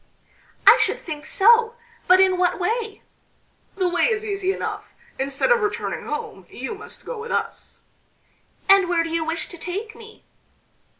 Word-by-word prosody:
"I - - +9
should - - +1
think 305 -2 -7
so! 460 +3 +4 0.3
But 370 +1 +6
in 375 -1 +4
what 360 -1 +2
way?" 430 +3 -3 0.7
"The 375 -2 0
way 350 0 +1
is 440 -1 -2
easy 395 -2 -1
enough. - - -6 0.2
Instead 275 - 0
of 475 -1 +4
returning 420 0 -3
home 195 -11 -6
you 265 - -6
must 420 - -10
go 485 -2 -6
with 465 +2 -7
us." - - -4 0.9
"And 390 -2 +5
where 340 -2 +2
do 330 - -6
you 330 -1 0
wish 325 +1 -2
to 350 - -10
take 405 +7 -5
me?" 445 -1 -14
385 Hz, 165 wpm, -22 LUFS, 335-440 Hz, 0.9 s, I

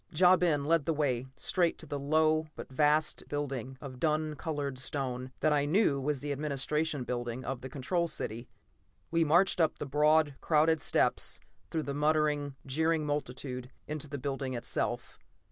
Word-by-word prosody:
Ja 180 +3 +6
Ben 165 -6 +2
led 165 -2 +3
the 165 - +1
way 130 -4 0
straight 175 -3 +1
to - - -9
the 145 -1 -4
low 155 +2 +2
but - - -9
vast 150 +3 +2
building 135 -3 -4
of 130 -2 -8
dun 155 0 0
colored 145 -4 -3
stone 130 -1 -2
that 155 - +3
I 145 -1 +2
knew 150 -4 +2
was 145 -1 -1
the 145 - -3
administration 150 +1 -1
building 120 0 -4
of 135 -2 -3
the 130 - -6
Control 170 +6 -1
City. 120 -6 -4 0.6
We 165 0 +3
marched 175 +4 +4
up 160 - +2
the - - -4
broad, 150 0 +3
crowded 160 0 +3
steps, - - +1 0.3
through 160 -1 -1
the 140 - -3
muttering, 150 -1 +1
jeering 160 +3 +1
multitude 130 -3 -3 0.2
into 150 0 -4
the 145 - -4
building 135 -1 -3
itself. 120 - -3
145 Hz, 165 wpm, -31 LUFS, 135-155 Hz, 0.6 s, Ja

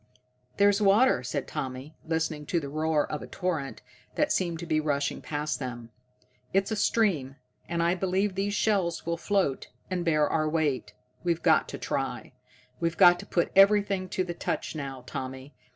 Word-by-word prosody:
"There's 200 +1 +4
water," 205 - +4
said 130 +2 -3
Tommy, 130 +4 -5
listening 160 -2 -2
to 170 - +1
the 140 -3 -6
roar 155 0 +1
of 150 - -3
a - - -8
torrent 160 -7 -3 0.3
that 300 - +1
seemed 170 -3 0
to 170 - -6
be 155 -2 +1
rushing 145 -2 -1
past 150 0 -3
them. 120 -3 -6 0.6
"It's 195 +2 +2
a - - +1
stream, 185 - +1 0.3
and 170 0 0
I 170 +1 +3
believe 190 +2 0
these 200 +2 -1
shells 190 -6 +1
will 170 0 0
float 185 -6 0 0.2
and 180 -1 -1
bear 155 -3 +3
our 155 0 0
weight. 140 -9 -1 0.3
We've 170 -2 0
got - - +4
to - - -5
try. - - -3 0.5
We've 170 0 -1
got 175 -2 +7
to - - -9
put 170 - 0
everything 195 -1 +4
to 185 - -1
the 175 -1 -4
touch 170 - -3
now, 135 -4 -6
Tommy. 130 +2 -6
165 Hz, 175 wpm, -28 LUFS, 145-190 Hz, 0.6 s, got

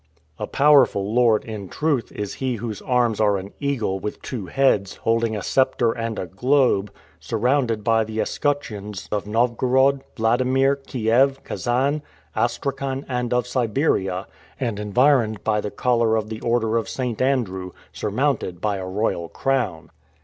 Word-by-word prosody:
A - - -3
powerful 130 -8 +4
lord, 115 -3 +3
in 105 -4 -6
truth, 145 -7 -1
is 105 -1 -5
he 130 -2 -2
whose 110 -2 -5
arms 120 -4 +1
are 105 -2 +3
an 95 +2 -8
eagle 120 -9 -1
with 105 - -5
two 110 -8 -5
heads, 105 -4 +2
holding 115 0 0
a 100 - -5
scepter 130 -3 +2
and 115 -1 -4
a - - -3
globe, 105 - +2 0.3
surrounded 125 -4 0
by 115 0 +3
the 110 0 -5
escutcheons 105 -11 -2
of 105 -1 -2
Novgorod, 125 +4 +2 0.2
Wladimir, 130 +4 +2
Kiev, 130 +3 +2
Kasan, 135 +5 0 0.3
Astrakhan, 135 +3 -2
and 125 -2 -2
of 125 -1 +1
Siberia, 115 - 0 0.3
and 115 -6 -2
environed 110 0 +2
by 105 -1 +1
the 105 - -3
collar 115 -1 +1
of 110 -1 -2
the 110 0 -6
order 115 -1 +1
of 110 -4 -2
St. 125 -4 -3
Andrew, 110 -9 0 0.2
surmounted 90 -1 -1
by 105 +1 -1
a 95 -1 -5
royal 95 -4 -1
crown! 125 - -1
115 Hz, 150 wpm, -23 LUFS, 105-130 Hz, 0.3 s, powerful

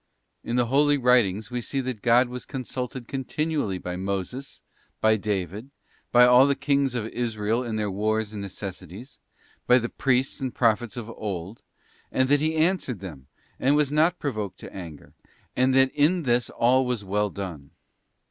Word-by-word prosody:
't - - -10
In 120 - 0
the 125 -1 +3
Holy 145 +4 +3
Writings 120 -5 +2
we 125 0 -2
see 135 +4 -3
that 125 -5 -5
God 120 +1 +4
was 125 0 -7
consulted 125 -2 -5
continually 140 - -2
by 90 0 -5
Moses, 100 +8 -4 0.4
by 110 0 +4
David, 100 - -3 0.4
by 125 0 +7
all 125 +2 +7
the 140 - +2
Kings 140 -2 +1
of 115 -3 -2
Israel 115 0 -1
in 115 -3 -4
their 105 -2 -1
wars 110 +2 -1
and 105 - -5
necessities, 100 - -8 0.5
by 125 - +7
the 120 -1 -1
Priests 135 +1 0
and 130 -3 -3
Prophets 115 -1 +1
of 115 -1 -6
old, 100 -2 -6 0.5
and 130 0 +1
that 145 0 +4
He 155 +1 0
answered 160 - +1
them, 75 -9 -9 0.3
and 140 +3 +3
was 150 -2 +2
not 160 +4 +3
provoked 110 - -4
to - - -10
anger, 85 -6 -9 0.4
and 130 +1 +3
that 135 0 +5
in 160 +4 +2
this 120 -2 +1
all 130 +3 +3
was 125 -5 -3
well 105 +2 0
done. 85 -8 -7
120 Hz, 175 wpm, -25 LUFS, 105-135 Hz, 0.5 s, by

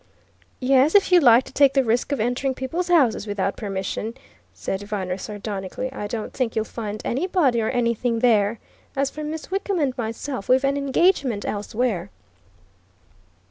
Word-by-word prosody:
"Yes 270 +4 +3
if 400 -2 +5
you 360 - +8
like 245 -4 +6
to - - -13
take 275 -1 +5
the 270 - +4
risk 240 +4 0
of 280 - 0
entering 245 +4 0
people's 325 +8 -3
houses 275 -11 +3
without 200 -1 -1
permission!" 205 +2 -4 0.4
said 195 - -4
Viner 195 -3 -3
sardonically. 205 +4 -5
"I 210 - -4
don't 220 0 -5
think 250 -4 -2
you'll 220 -1 0
find 215 -2 -5
anybody 280 -4 +1
or 220 - 0
anything 235 -1 0
there. 225 -2 +3 0.4
As 275 0 0
for 305 - -7
Miss 315 +3 -6
Wickham 390 0 -1
and 275 -6 0
myself, 230 +1 -4
we've 260 +2 +4
an 275 +1 +1
engagement 280 - +1
elsewhere." 205 -2 -2
245 Hz, 160 wpm, -23 LUFS, 215-275 Hz, 0.4 s, you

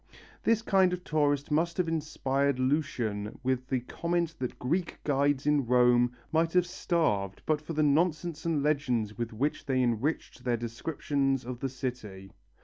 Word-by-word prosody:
This 230 -1 +2
kind 190 -4 +3
of 180 0 -4
tourist 145 -2 +1
must 165 +3 +1
have 180 -2 +1
inspired 140 -4 0
Lucian 130 -7 -1
with 130 0 0
the 130 -2 0
comment 170 +5 -1
that 125 -1 -4
Greek 170 +8 -1
guides 140 -1 +1
in 145 -4 +2
Rome 125 0 +4 0.2
might 165 +1 +2
have 180 -1 +4
starved 105 - -1
but 155 -1 +1
for 155 +2 -6
the 155 0 +2
nonsense 160 +1 +1
and 160 -4 0
legends 125 -8 0
with 120 0 -2
which 135 +8 -2
they 130 -2 +2
enriched 125 +6 -1
their 120 -2 +1
descriptions 135 +2 -1
of 125 -1 -5
the 135 - -2
city. 110 -7 -6
140 Hz, 160 wpm, -29 LUFS, 125-160 Hz, 0.2 s, Rome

